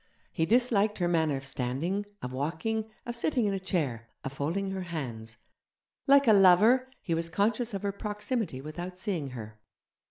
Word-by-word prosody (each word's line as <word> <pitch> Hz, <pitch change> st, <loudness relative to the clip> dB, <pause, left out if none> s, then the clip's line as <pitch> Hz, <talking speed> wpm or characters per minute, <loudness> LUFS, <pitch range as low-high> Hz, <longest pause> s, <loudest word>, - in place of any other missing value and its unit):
He 160 Hz, -, 0 dB
disliked 220 Hz, -2 st, +3 dB
her 175 Hz, -, +1 dB
manner 160 Hz, -4 st, +2 dB
of 135 Hz, -, -8 dB
standing, 140 Hz, +10 st, -2 dB, 0.2 s
of 125 Hz, -, -4 dB
walking, 180 Hz, +11 st, -2 dB, 0.2 s
of 240 Hz, -, -4 dB
sitting 245 Hz, 0 st, +1 dB
in 200 Hz, -, +1 dB
a 195 Hz, -, -1 dB
chair, 135 Hz, -12 st, -2 dB
of 135 Hz, -, -5 dB
folding 170 Hz, +8 st, -2 dB
her 190 Hz, 0 st, -3 dB
hands. 120 Hz, -10 st, -5 dB, 0.7 s
Like 280 Hz, -1 st, +6 dB
a 220 Hz, -, +8 dB
lover, 210 Hz, +7 st, +6 dB
he 170 Hz, -, -1 dB
was 165 Hz, 0 st, -1 dB
conscious 215 Hz, +5 st, 0 dB
of 195 Hz, -, -4 dB
her 200 Hz, -, 0 dB
proximity 210 Hz, -, -3 dB
without 175 Hz, +5 st, -6 dB
seeing 180 Hz, -8 st, -2 dB
her. 110 Hz, -4 st, -9 dB
180 Hz, 170 wpm, -29 LUFS, 140-210 Hz, 0.7 s, a